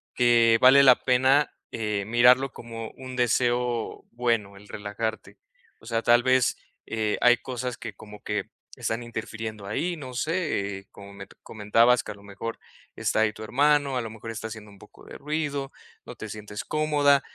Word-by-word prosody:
que 120 -2 +5
vale 130 +2 +8
la 130 -2 +8
pena, 130 +3 +3 0.2
eh, 105 -3 -2
mirarlo 125 +3 +5
como 115 -1 -8
un 130 -1 -8
deseo 120 -1 0
bueno, 115 -4 -1
el 105 +1 -15
relajarte, 110 +2 -5 0.4
o - - -19
sea, 115 -1 0
tal 120 0 +5
vez, 130 0 +3 0.3
eh, 110 -1 -1
hay 125 0 +6
cosas 125 -1 -5
que 115 -4 -7
como 105 +1 -13
que 105 -2 -3 0.3
están 115 +2 -3
interfiriendo 110 -2 -6
ahí, 170 - -2
no 130 -4 -8
sé, 120 - -2
como 100 0 -12
me 100 0 -10 0.2
comentabas 115 +2 +3
que - - -7
a - - -9
lo 100 - -17
mejor 100 +3 -6 0.4
está - - 0
ahí 110 -1 +3
tu 110 - -9
hermano, 140 +3 +2
a - - 0
lo 115 - -6
mejor 110 +1 -8
está 110 0 -5
haciendo 110 -2 -10
un 100 - -17
poco - - -17
de - - -10
ruido, 145 -2 -3 0.3
no - - -9
te 110 - -8
sientes 105 0 -7
cómoda, 145 -2 +3
115 Hz, 175 wpm, -26 LUFS, 105-130 Hz, 0.4 s, vale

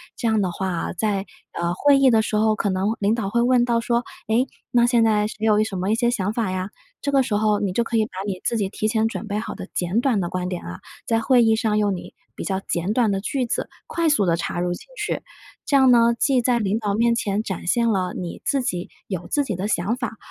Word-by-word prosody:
这 235 - -2
样 220 -1 +2
的 185 -2 0
话 190 +2 -3
啊， 175 -2 -3
在， 200 0 -1 0.3
呃， 170 0 -1
会 285 +8 +4
议 275 -1 +5
的 225 - +4
时 215 -1 -1
候， 215 0 +3
可 205 - -1
能 195 +4 0
领 205 +1 +2
导 210 -4 -2
会 235 +2 +1
问 245 0 +4
到 235 -1 +1
说： 235 +1 0 0.3
“诶， 245 +4 +2 0.2
那 240 -1 +4
现 240 -1 +3
在 210 -2 +3
谁 - - -8
有 210 -1 +4
一 - - +4
什 200 -3 -4
么 185 +3 -1
一 - - +3
些 240 +1 +2
想 205 -3 -1
法 220 -4 -1
呀？” 185 +1 -3 0.3
这 280 - -1
个 275 - +4
时 230 -4 -1
候 210 0 +2
你 200 -2 -1
就 235 - +1
可 230 0 -1
以 220 - +3
把 - - -14
你 190 -3 -4
自 235 - 0
己 200 -3 0
提 215 +2 -2
前 220 0 +1
准 225 -1 -5
备 205 0 -2
好 225 - -5
的 185 - -8
简 180 +6 0
短 250 -5 +2
的 175 - -1
观 180 0 -3
点 180 - -4
啊， 85 0 -7 0.3
在 225 -1 +1
会 245 0 +4
议 225 -1 +4
上 220 -2 0
用 205 -2 +1
你 175 - -10 0.2
比 - - -6
较 190 -1 -1
简 175 +5 -1
短 230 -4 +2
的 195 - -1
句 255 +4 -1
子 235 - -3 0.2
快 335 -1 +1
速 250 -10 +3
地 170 -2 +2
插 175 - -3
入 175 0 0
进 - - -10
去。 - - -2 0.5
这 280 - +4
样 265 -2 +6
呢， 235 -1 +5
既 260 -1 +2
在 245 0 +2
领 210 +1 0
导 205 -2 -1
面 235 +2 +3
前 210 -2 -1
展 190 -3 -5
现 235 +4 +2
了 185 -4 0
你 175 -2 -6
自 275 -2 +1
己 180 -6 -3 0.2
有 180 -3 -4
自 290 - +1
己 215 -9 -3
的 190 +3 -3
想 200 +3 0
法， 235 -4 -4
215 Hz, 295 characters per minute, -23 LUFS, 195-235 Hz, 0.5 s, 样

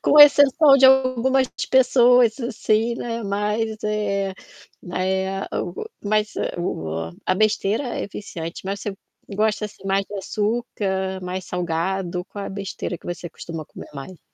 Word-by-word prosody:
com 300 - +4
exceção 285 0 +7
de 270 - +4
algumas 260 0 +3 0.2
pessoas 250 -2 +5
assim, 230 -1 0
né, 235 -1 -4
mais, 210 +2 -1
eh, 200 -2 -1 0.5
mai 185 +1 -3 0.2
eh 195 0 -4
o 175 - -3 0.2
mas 210 +1 +1 0.2
o 80 - -3 0.2
a 185 - +3
besteira 215 +2 +1
é - - -3
viciante 170 -5 -7
mas 200 +1 -3
você 205 -2 -5 0.4
gosta 215 0 +1
assim 210 -2 -10
mais 195 0 +1
de - - -9
açúcar, 195 -2 -2
mais 185 0 -5
salgado, 180 +1 -2
qual 200 -1 -7
é - - -4
a - - -6
besteira 195 -2 -5
que - - -16
você 175 0 -5
costuma 165 -1 -7
comer - - -11
mais? 150 +4 -9
205 Hz, 150 wpm, -22 LUFS, 185-230 Hz, 0.5 s, exceção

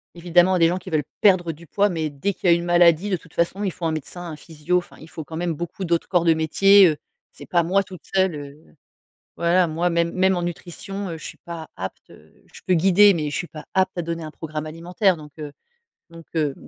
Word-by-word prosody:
évidemment 175 +1 +3
à 185 - +2
des 165 - +5
gens 180 - -1
qui 185 - -9
veulent 155 -3 0 0.2
perdre 185 -5 +4
du 165 +2 -14
poids, 205 +4 +2
mais 160 -4 -2
dès 145 +8 -2
qu'il 180 - -1
y - - +7
a - - +5
une 170 - -3
maladie, 175 +2 +4
de 185 - 0
toute 165 0 -20
façon, 175 +4 -1
il 195 - 0
faut 170 - -6
un 165 - +1
médecin, 160 +3 -6
un - - -6
physio. 160 +3 -2
Enfin, 175 - -5
il 155 - -13
faut 160 -2 -8
quand 160 - -9
même 170 0 -1
beaucoup 175 +4 -6
d'autres 170 -2 0
corps 175 -3 +2
de 165 -1 +4
métier. 195 +5 +5
Heu, 155 -3 0 0.4
c'est - - -12
pas 175 -1 +2
moi 195 +4 +2
toute 185 -2 -12
seule, 190 -3 +2
heu 145 +2 -11 0.6
voilà, 175 +1 +3
moi 165 +3 0
même 170 0 +1
même 190 +1 +2
en 175 - -2
nutrition, 180 +3 -6
heu, 165 - -6
je - - -12
suis - - -8
pas 165 -2 -9
apte - - -7
heu, - - -18 0.2
je - - -14
peux 185 - +2
guider, 195 +4 +6
mais 155 -4 -2
je 145 - -5
suis 175 - -2
pas 155 -2 -11
apte 190 0 +2
à - - 0
donner 165 0 -4
un 155 - -7
programme 155 -1 -6
alimentaire, 175 +4 0
donc 150 -2 -12
heu, 150 -1 -6 0.6
donc 165 0 -13
heu 150 -3 0
170 Hz, 255 wpm, -22 LUFS, 160-185 Hz, 0.6 s, y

